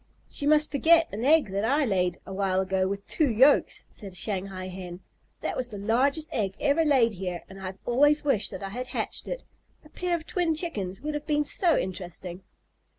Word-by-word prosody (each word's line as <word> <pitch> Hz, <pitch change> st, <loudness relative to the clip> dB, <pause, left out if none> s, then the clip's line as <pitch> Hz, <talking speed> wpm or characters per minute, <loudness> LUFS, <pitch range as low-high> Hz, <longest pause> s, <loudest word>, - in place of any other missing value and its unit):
"She 285 Hz, -, -2 dB
must 300 Hz, 0 st, +4 dB
forget 325 Hz, +3 st, +5 dB
an 215 Hz, +3 st, -4 dB
egg 295 Hz, -4 st, +4 dB
that 200 Hz, +1 st, -1 dB
I 280 Hz, +6 st, +2 dB
laid 180 Hz, -5 st, 0 dB
a 195 Hz, -, -7 dB
while 190 Hz, -1 st, +1 dB
ago 190 Hz, 0 st, 0 dB
with 200 Hz, +1 st, -4 dB
two 310 Hz, -4 st, +1 dB
yolks," 260 Hz, +6 st, +3 dB
said 195 Hz, -4 st, -9 dB
a -, -, -11 dB
Shanghai 190 Hz, -1 st, -3 dB
Hen. 180 Hz, -1 st, -8 dB, 0.4 s
"That -, -, -2 dB
was 255 Hz, -, -1 dB
the 215 Hz, -4 st, -8 dB
largest 265 Hz, +9 st, +1 dB
egg 195 Hz, -4 st, -1 dB
ever 290 Hz, +4 st, +2 dB
laid 260 Hz, -7 st, +3 dB
here, 180 Hz, -2 st, -5 dB
and 195 Hz, 0 st, -12 dB
I 190 Hz, -, -7 dB
have 190 Hz, +1 st, -7 dB
always 290 Hz, +5 st, +3 dB
wished 260 Hz, -8 st, +1 dB
that -, -, -7 dB
I 195 Hz, -, -4 dB
had 250 Hz, +5 st, -5 dB
hatched -, -, -4 dB
it. -, -, -5 dB, 0.4 s
A -, -, -15 dB
pair 355 Hz, +2 st, -1 dB
of 325 Hz, -1 st, -6 dB
twin 345 Hz, -3 st, 0 dB
chickens 205 Hz, -, -2 dB
would 300 Hz, +1 st, -3 dB
have 295 Hz, 0 st, -5 dB
been 295 Hz, -1 st, +1 dB
so 340 Hz, +1 st, +2 dB
interesting." 180 Hz, -1 st, -5 dB
225 Hz, 215 wpm, -27 LUFS, 190-295 Hz, 0.4 s, forget